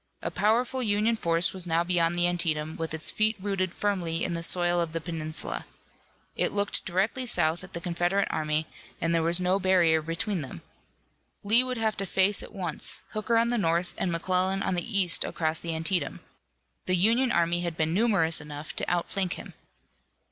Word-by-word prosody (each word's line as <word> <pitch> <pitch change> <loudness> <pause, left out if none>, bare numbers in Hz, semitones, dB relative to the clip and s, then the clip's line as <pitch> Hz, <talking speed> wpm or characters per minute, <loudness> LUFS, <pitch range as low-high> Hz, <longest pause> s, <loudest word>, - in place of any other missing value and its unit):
A - - -2
powerful 240 +5 +1
Union 215 0 +1
force 170 -4 +1
was 185 -2 -2
now 165 0 +2
beyond 175 -1 +1
the 175 0 +3
Antietam, 160 -3 -1
with 165 0 -4
its 160 0 -1
feet 215 +1 +1
rooted 190 -2 -2
firmly 175 -5 -2
in 175 - -1
the 170 - -3
soil 175 +1 +3
of 165 -2 -3
the 165 - -2
peninsula. 160 -2 -5 0.7
It - - +1
looked 205 0 -1
directly 200 +8 -1
south 165 -6 +3
at 190 - -12
the 170 - -3
Confederate 175 +3 0
army 155 0 -1 0.3
and 165 0 0
there 165 - +2
was 170 +2 +2
no 185 +2 +1
barrier 175 -4 +3
between. 165 - -4 0.8
Lee 225 +5 +5
would 255 -1 -4
have 220 -1 0
to 195 - -3
face 195 +2 +4
at - - -10
once, 180 -6 -4
Hooker 215 +2 -1
on 230 +1 +2
the 240 -1 0
north 170 -1 0
and 180 - -2
McClellan 185 +3 0
on - - -1
the 200 +4 0
east 180 -3 +4
across 160 -1 -2
the 165 -1 -4
Antietam. 160 -2 0 0.7
The 185 - +3
Union 230 +7 +2
army 170 -1 +1
had 170 -2 -4
been 160 0 0
numerous 190 -7 +3
enough 150 +1 -8
to - - -2
outflank 175 +1 -1
him. - - -9
175 Hz, 185 wpm, -27 LUFS, 165-200 Hz, 0.8 s, Lee